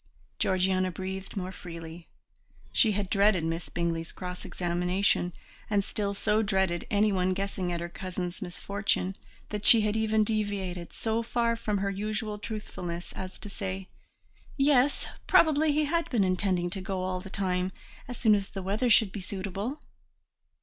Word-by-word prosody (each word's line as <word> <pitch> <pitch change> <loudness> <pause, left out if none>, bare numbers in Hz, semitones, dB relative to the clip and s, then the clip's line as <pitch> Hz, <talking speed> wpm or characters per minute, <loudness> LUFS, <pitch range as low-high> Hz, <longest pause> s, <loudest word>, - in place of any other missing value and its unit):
Georgiana 185 0 +2
breathed 190 +2 -5
more 185 -1 -3
freely; 165 -2 -9 0.7
she 220 -4 +5
had 200 -1 -1
dreaded 200 -3 +4
Miss 165 +1 -2
Bingley's 165 -1 -2
cross 180 -1 -6
examination, 180 +1 +1 0.4
and 205 -2 +2
still 200 0 -2
so 210 +2 +2
dreaded 190 -4 +1
anyone 200 -3 +2
guessing 195 -2 -2
at 170 -1 -2
her 170 - -3
cousin's 180 +1 -5
misfortune 195 +1 -1 0.3
that 210 -1 -4
she 225 0 +8
even 220 0 +2
deviated 200 -5 -2
so 225 0 -1
far 235 0 +1
from 210 -2 -1
her 200 0 0
usual 210 +1 -3
truthfulness 180 -6 -5
as 185 0 -6
to - - -7
say, 190 -1 -5 0.7
"Yes, 275 -1 +4 0.2
probably 310 -1 +5
he 300 +1 +2
had 335 +3 0
been 230 -6 +3
intending 185 -1 +1
to 190 0 -3
go 190 0 -2
all 185 0 -2
the 195 - -9
time, 185 -1 0 0.4
as 245 - -6
soon 220 -3 +5
as 200 -1 +1
the 195 -2 -6
weather 210 +6 +1
should 220 -3 +6
be 205 - -5
suitable." 200 +7 -4
195 Hz, 155 wpm, -29 LUFS, 185-215 Hz, 0.7 s, she